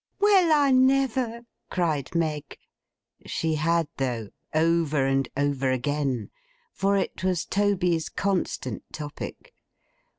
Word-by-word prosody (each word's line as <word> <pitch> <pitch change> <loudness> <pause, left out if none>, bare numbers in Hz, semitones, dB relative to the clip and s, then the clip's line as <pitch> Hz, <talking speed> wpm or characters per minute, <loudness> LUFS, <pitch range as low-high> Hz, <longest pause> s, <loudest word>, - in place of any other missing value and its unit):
'Well, 395 -5 +5
I 290 -3 +4
never!' 260 -3 +2 0.3
cried 160 -5 -1
Meg. 155 -3 -2 0.7
She 160 -1 -1
had, 165 +1 +1
though—over 145 +5 0
and 135 -1 +1
over 140 -2 +1
again. 130 -2 -1 0.4
For 200 +1 +1
it 190 - -3
was 185 -3 0
Toby's 180 -5 +1
constant 180 - -2
topic. 155 - -7
165 Hz, 100 wpm, -26 LUFS, 145-200 Hz, 0.7 s, Well